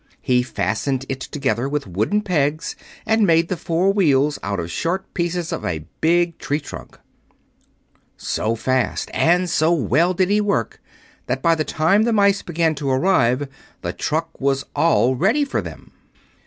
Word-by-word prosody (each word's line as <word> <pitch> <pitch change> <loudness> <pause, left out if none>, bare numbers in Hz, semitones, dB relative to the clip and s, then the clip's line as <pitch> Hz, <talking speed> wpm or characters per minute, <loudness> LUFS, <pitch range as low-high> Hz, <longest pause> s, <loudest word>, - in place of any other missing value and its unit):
He 125 -1 +3
fastened 125 +4 -2
it 135 - -3
together 135 -2 -2
with 145 0 -2
wooden 110 - -1
pegs 155 -5 -1 0.3
and 220 0 +2
made 165 0 +3
the 185 - 0
four 175 +4 +1
wheels 150 -7 +2
out 100 -1 -3
of 85 0 -4
short 180 - -3
pieces 170 -1 -2
of - - -4
a 80 -3 -3 0.2
big 170 +1 +2
tree 145 +1 -1
trunk. 145 - -10 1.2
So 115 +1 -1
fast 130 +1 -1
and 180 +2 +3
so 160 -1 +2
well 165 - +2
did 185 +1 +1
he 210 +1 +3
work 200 - -1 0.5
that 130 - -2
by 165 - +4
the 155 -1 0
time 160 +7 +2
the 230 +1 +2
mice 200 -1 +3
began 165 -1 0
to 140 - -1
arrive 130 -2 +2 0.4
the - - -3
truck 165 +1 -3
was 135 0 0
all 130 -6 +3
ready 220 - +2
for 280 - -2
them. - - -10
155 Hz, 165 wpm, -21 LUFS, 130-180 Hz, 1.2 s, by